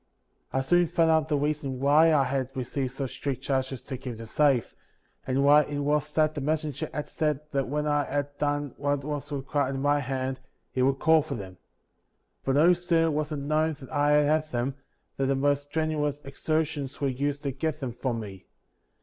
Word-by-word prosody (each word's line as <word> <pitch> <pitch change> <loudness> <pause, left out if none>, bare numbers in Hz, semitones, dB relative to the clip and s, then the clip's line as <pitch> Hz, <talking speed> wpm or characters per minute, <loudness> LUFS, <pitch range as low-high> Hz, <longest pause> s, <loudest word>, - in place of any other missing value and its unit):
60. - - -46
I - - +3
soon 175 +6 +3
found 165 0 +3
out 160 -1 +2
the 150 - +2
reason 145 -3 -2
why 150 +4 +5
I 145 -3 +4
had 130 -1 -1
received 130 0 -2
such 135 -1 -4
strict 135 -2 -4
charges 130 -2 -1
to 130 - -5
keep 125 -3 -6
them 115 - -8
safe, 135 0 +2 0.5
and 130 +1 +1
why 145 +1 +7
it 145 - -4
was 150 +1 0
that 155 -1 +3
the 145 - -4
messenger 150 -1 -2
had 150 - -4
said 150 -3 0
that 135 -2 0
when 150 +3 -1
I 145 -1 +1
had 145 0 -3
done 145 -2 -1
what 145 0 -1
was 150 0 -4
required 140 -1 -1
at - - -3
my 145 +1 +2
hand, 130 -1 -3 0.3
he 130 - -1
would 135 +1 +3
call 160 +2 +5
for 145 -2 -5
them. 95 -4 -8 0.8
For 135 - -1
no 165 +5 +6
sooner 170 -2 +1
was 150 +1 -2
it 150 - -2
known 155 +3 +1
that 140 -3 -12
I 145 -1 +3
had 150 +1 +3
them, 125 +1 -1 0.4
than 135 - +1
the 135 - +2
most 145 +1 +1
strenuous 150 -2 -1
exertions 145 -1 -2
were 140 - +1
used 140 +2 -2
to 140 - -1
get 155 +3 -2
them 130 -5 -4
from 120 -1 -2
me. 95 -3 -10
145 Hz, 205 wpm, -27 LUFS, 135-150 Hz, 0.8 s, why